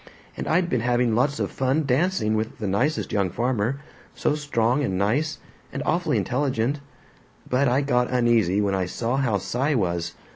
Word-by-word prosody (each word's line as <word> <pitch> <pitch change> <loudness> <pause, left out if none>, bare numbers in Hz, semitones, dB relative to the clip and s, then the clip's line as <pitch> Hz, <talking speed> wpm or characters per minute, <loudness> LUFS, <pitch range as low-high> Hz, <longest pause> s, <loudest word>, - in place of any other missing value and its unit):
And - - -5
I'd 175 +2 +2
been 125 -9 0
having 120 -1 +2
lots 135 +6 +1
of - - -1
fun 135 +4 0
dancing 140 - +1
with 110 0 -2
the 105 - -3
nicest 130 +11 0
young 100 -3 +1
farmer, 120 +5 -1 0.3
so - - +1
strong 145 -3 0
and 95 -7 -1
nice, 140 +11 0 0.3
and - - -4
awfully - - +1
intelligent. 130 0 0 0.7
But 130 +2 +2
I 125 +3 +2
got 125 -3 +1
uneasy 115 -6 +2
when 100 -1 0
I 95 -2 0
saw 120 +7 -2
how 120 -7 +1
Cy 130 +9 -1
was. 85 -5 -1
125 Hz, 175 wpm, -24 LUFS, 110-140 Hz, 0.7 s, I'd